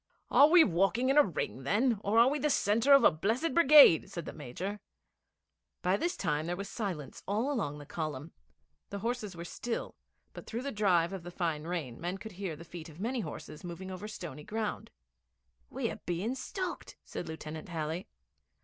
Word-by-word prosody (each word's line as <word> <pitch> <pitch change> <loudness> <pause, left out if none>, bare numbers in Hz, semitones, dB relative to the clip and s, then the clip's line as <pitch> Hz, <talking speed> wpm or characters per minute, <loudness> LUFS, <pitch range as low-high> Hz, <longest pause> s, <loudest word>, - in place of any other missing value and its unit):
'Are 285 - +8
we 345 0 +8
walking 195 - +2
in 275 - +3
a - - +8
ring, 150 - -3
then, 215 - +1
or 205 +3 +1
are 235 +2 +7
we 290 +3 +1
the 300 - +1
centre 230 +1 +2
of 275 0 +8
a - - +7
blessed 225 - -1
brigade?' 295 - +8
said 170 -2 -6
the - - -6
Major. 170 +9 -5 1.0
By 185 +1 +3
this 345 +12 -1
time 155 -3 -1
there 175 - -1
was 200 +2 -5
silence 180 - -5
all 220 +8 0
along 200 - -2
the 145 - -10
column. 155 0 -5 0.6
The 200 - -5
horses 220 -2 -3
were 170 0 -7
still; 235 +6 -4 0.4
but, - - -10
through 235 +2 -4
the 280 - -3
drive 190 -5 +2
of 190 - -5
the 175 - -8
fine 165 -4 -2
rain, 160 -9 -4
men 175 +3 -3
could 220 +2 -9
hear 185 -3 -5
the 170 - -11
feet 170 -1 -9
of 155 +1 -14
many 240 +5 -1
horses 155 -7 -7
moving 180 +2 -7
over 185 +3 -6
stony 155 -8 -7
ground. 215 +3 -3 0.8
'We're - - -3
being 180 +8 -1
stalked,' 365 +8 -5
said - - -6
Lieutenant 160 +1 -7
Halley. 160 +1 -3
190 Hz, 190 wpm, -31 LUFS, 165-230 Hz, 1.0 s, Are